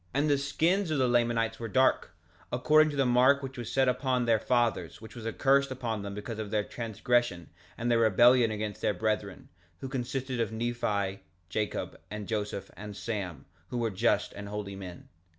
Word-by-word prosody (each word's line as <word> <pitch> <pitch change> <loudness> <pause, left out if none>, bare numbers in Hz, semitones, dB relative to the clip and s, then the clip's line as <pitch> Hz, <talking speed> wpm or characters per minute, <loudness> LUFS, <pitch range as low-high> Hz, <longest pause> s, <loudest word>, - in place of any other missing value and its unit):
3:6 90 - -37
And 145 +2 +2
the 140 - +4
skins 165 +7 +1
of 155 - 0
the 130 -2 +3
Lamanites 115 -2 +1
were 115 - -4
dark, 130 +2 +2 0.4
according 155 +5 +4
to 145 - -5
the 135 -1 +2
mark 130 +3 +4
which 135 0 -6
was 120 -4 -6
set 135 -1 +3
upon 125 0 +1
their 115 -2 +3
fathers, 115 -8 0
which 110 +1 -12
was 115 -2 -6
a - - -1
curse 140 +2 +3
upon 120 -5 -3
them 100 0 -6
because 105 +2 -6
of 110 -2 -4
their 105 0 +1
transgression 115 -4 -1 0.3
and 120 +1 -1
their 115 - +4
rebellion 120 +2 +5
against 105 -1 -4
their 105 - +1
brethren, 105 -1 -2 0.3
who 135 - -5
consisted 130 0 -3
of 115 -1 0
Nephi, 110 -4 -1 0.3
Jacob, 105 +2 -3
and 105 0 -6
Joseph, 105 -3 -3
and 105 0 -8
Sam, 100 -7 -4 0.2
who 125 - -4
were 115 -2 0
just 95 - +1
and 100 0 -8
holy 105 -1 -5
men. 90 -3 -9
115 Hz, 195 wpm, -29 LUFS, 105-130 Hz, 0.4 s, rebellion